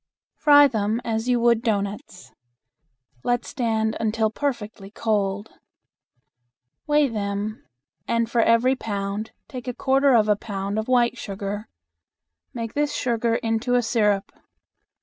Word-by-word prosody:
Fry 290 Hz, -1 st, +7 dB
them 220 Hz, -2 st, -1 dB
as 225 Hz, +1 st, -1 dB
you 245 Hz, -1 st, +3 dB
would 235 Hz, -1 st, +4 dB
doughnuts. 200 Hz, -4 st, -3 dB, 0.9 s
Let 245 Hz, 0 st, 0 dB
stand 220 Hz, -3 st, -1 dB
until 220 Hz, 0 st, 0 dB
perfectly 220 Hz, -7 st, -4 dB
cold. 205 Hz, -1 st, -1 dB, 1.4 s
Weigh 295 Hz, -1 st, +4 dB
them, 210 Hz, -1 st, -3 dB, 0.4 s
and 230 Hz, 0 st, +1 dB
for 235 Hz, +1 st, +1 dB
every 230 Hz, +4 st, +3 dB
pound 205 Hz, -2 st, -4 dB, 0.2 s
take 255 Hz, -1 st, -8 dB
a 250 Hz, -, -3 dB
quarter 270 Hz, 0 st, +3 dB
of 215 Hz, -2 st, +4 dB
a 210 Hz, -, +4 dB
pound 200 Hz, 0 st, -4 dB
of 220 Hz, -, -4 dB
white 245 Hz, -1 st, +2 dB
sugar. 200 Hz, +1 st, -5 dB, 0.8 s
Make 230 Hz, -2 st, -5 dB
this 295 Hz, 0 st, 0 dB
sugar 235 Hz, -1 st, 0 dB
into 230 Hz, +1 st, 0 dB
a 245 Hz, -, +3 dB
syrup. 210 Hz, -3 st, +1 dB
225 Hz, 130 wpm, -23 LUFS, 210-245 Hz, 1.4 s, Fry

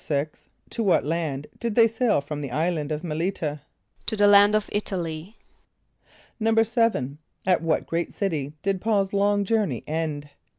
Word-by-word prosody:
= -, -, -34 dB
To 235 Hz, -, -2 dB
what 195 Hz, -9 st, +3 dB
land 150 Hz, -3 st, -2 dB
did 230 Hz, -3 st, -2 dB
they 230 Hz, -1 st, +7 dB
sail 225 Hz, -, +1 dB
from 145 Hz, +1 st, -5 dB
the 140 Hz, -, -4 dB
island 155 Hz, +2 st, -1 dB
of 155 Hz, +2 st, -3 dB
M[)e]l´[)i] 165 Hz, +4 st, -1 dB
t[.a]? 150 Hz, -2 st, -4 dB, 0.5 s
=To 220 Hz, -, 0 dB
the 205 Hz, -1 st, +4 dB
land 205 Hz, +1 st, +7 dB
of 215 Hz, -1 st, +1 dB
[)I]t´a 205 Hz, -2 st, -1 dB
l[)y].= 165 Hz, +4 st, -5 dB, 1.1 s
=7.= 225 Hz, -, +2 dB, 0.3 s
At 180 Hz, -3 st, +3 dB
what 165 Hz, -1 st, 0 dB
great 170 Hz, +1 st, -2 dB
city 155 Hz, -8 st, -2 dB
did 195 Hz, -2 st, 0 dB
P[a:]ul's 205 Hz, -3 st, +1 dB
long 200 Hz, 0 st, +2 dB
journey 200 Hz, -, 0 dB
end? 150 Hz, -2 st, -3 dB
180 Hz, 165 wpm, -25 LUFS, 155-210 Hz, 1.1 s, they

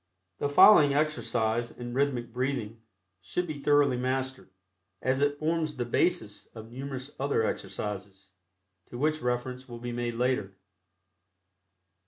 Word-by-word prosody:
The 145 Hz, -, 0 dB
following 145 Hz, -2 st, +7 dB
exercise 120 Hz, -6 st, 0 dB
in 120 Hz, 0 st, -8 dB
Rhythmic 125 Hz, -3 st, 0 dB
Breathing 125 Hz, -4 st, -2 dB, 0.4 s
should 100 Hz, -, -2 dB
be 155 Hz, -4 st, -6 dB
thoroughly 145 Hz, -3 st, +4 dB
mastered, 130 Hz, +1 st, -2 dB, 0.5 s
as 130 Hz, +1 st, 0 dB
it 145 Hz, 0 st, +2 dB
forms 155 Hz, 0 st, -1 dB
the 125 Hz, -2 st, -2 dB
basis 120 Hz, -5 st, 0 dB
of 110 Hz, 0 st, -10 dB
numerous 135 Hz, +1 st, -6 dB
other 135 Hz, -5 st, +1 dB
exercises, 95 Hz, -1 st, -5 dB, 0.6 s
to 120 Hz, -, -8 dB
which 155 Hz, +3 st, 0 dB
reference 125 Hz, +1 st, -3 dB
will 120 Hz, -, -7 dB
be 120 Hz, +1 st, -5 dB
made 120 Hz, -1 st, -3 dB
later. 120 Hz, -6 st, 0 dB
125 Hz, 130 wpm, -29 LUFS, 120-145 Hz, 0.6 s, following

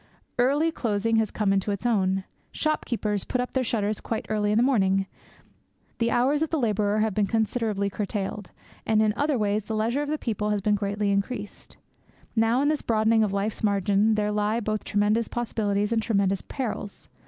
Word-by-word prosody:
Early 285 Hz, +6 st, +3 dB
closing 225 Hz, -4 st, 0 dB
has 220 Hz, -2 st, +2 dB
come 205 Hz, -2 st, 0 dB
into 195 Hz, +1 st, 0 dB
its 200 Hz, +3 st, -3 dB
own. 195 Hz, -5 st, +1 dB, 0.3 s
Shopkeepers 225 Hz, -9 st, -1 dB
put 255 Hz, -, -2 dB
up 250 Hz, -, -2 dB
their 260 Hz, -, 0 dB
shutters 215 Hz, -3 st, -1 dB
quite 225 Hz, -, -3 dB
early 210 Hz, -1 st, +1 dB
in 210 Hz, -, +2 dB
the 235 Hz, -, +4 dB
evening; 195 Hz, -7 st, +2 dB, 0.9 s
the 230 Hz, 0 st, +2 dB
hours 265 Hz, +6 st, +2 dB
of 320 Hz, -, +1 dB
the 325 Hz, -, 0 dB
labourer 210 Hz, -4 st, +1 dB
have 220 Hz, -1 st, +1 dB
been 205 Hz, 0 st, +1 dB
considerably 220 Hz, -2 st, 0 dB
curtailed; 200 Hz, 0 st, -4 dB, 0.3 s
and 220 Hz, -1 st, +2 dB
in 215 Hz, -1 st, +2 dB
other 290 Hz, 0 st, +1 dB
ways 210 Hz, -1 st, 0 dB
the 220 Hz, -, -3 dB
leisure 230 Hz, +6 st, 0 dB
of 295 Hz, -, -3 dB
the 305 Hz, -, 0 dB
people 215 Hz, -5 st, -2 dB
has 210 Hz, -1 st, +1 dB
been 210 Hz, +2 st, +1 dB
greatly 205 Hz, 0 st, 0 dB
increased. 200 Hz, +2 st, -3 dB, 0.6 s
Now 225 Hz, +4 st, +3 dB
in -, -, +2 dB
this 305 Hz, -1 st, 0 dB
broadening 220 Hz, 0 st, +3 dB
of 210 Hz, -, 0 dB
life's 200 Hz, +3 st, -2 dB
margin 205 Hz, +1 st, +2 dB
there 210 Hz, 0 st, 0 dB
lie 210 Hz, +2 st, 0 dB
both 215 Hz, -1 st, -2 dB
tremendous 210 Hz, +2 st, +1 dB
possibilities 210 Hz, -3 st, -1 dB
and 230 Hz, -1 st, +2 dB
tremendous 195 Hz, -4 st, +1 dB
perils. 220 Hz, -6 st, -4 dB
215 Hz, 190 wpm, -26 LUFS, 205-235 Hz, 0.9 s, the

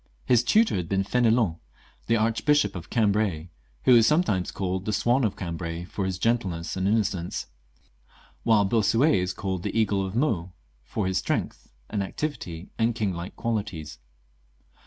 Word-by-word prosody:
His 120 Hz, -2 st, +4 dB
tutor 220 Hz, -, +3 dB
had 90 Hz, -3 st, -4 dB
been 95 Hz, 0 st, +1 dB
F6nelon, 115 Hz, -5 st, +2 dB, 0.5 s
the 115 Hz, -, +3 dB
Archbishop 115 Hz, 0 st, +2 dB
of 85 Hz, -1 st, -7 dB
Cambrai, 100 Hz, -7 st, 0 dB, 0.3 s
who 125 Hz, -, +7 dB
is 115 Hz, -1 st, +6 dB
sometimes 150 Hz, -, +2 dB
called 95 Hz, 0 st, -3 dB
the 105 Hz, -, -1 dB
Swan 120 Hz, +6 st, +2 dB
of 110 Hz, -, 0 dB
Cambrai, 85 Hz, -1 st, -5 dB
&om 100 Hz, -, -1 dB
his 95 Hz, -1 st, -2 dB
gentleness 95 Hz, -6 st, -1 dB
and 95 Hz, 0 st, 0 dB
inno 110 Hz, +2 st, +4 dB
cence; 90 Hz, -3 st, -3 dB, 1.0 s
while 110 Hz, -3 st, +4 dB
Bossuet 115 Hz, +8 st, +3 dB
is 90 Hz, 0 st, -1 dB
called 95 Hz, -1 st, -3 dB
the 115 Hz, -, -1 dB
Eagle 100 Hz, -3 st, +1 dB
of 95 Hz, +2 st, -5 dB
Meaux, 100 Hz, -, 0 dB, 0.3 s
from 100 Hz, -, -3 dB
his 95 Hz, 0 st, +1 dB
strength -, -, -3 dB, 0.2 s
and 105 Hz, -, -2 dB
activity, 95 Hz, -, -5 dB
and 115 Hz, 0 st, +2 dB
king 105 Hz, -4 st, -1 dB
like 85 Hz, +2 st, -7 dB
qualities. 105 Hz, -, -4 dB
100 Hz, 160 wpm, -26 LUFS, 90-115 Hz, 1.0 s, who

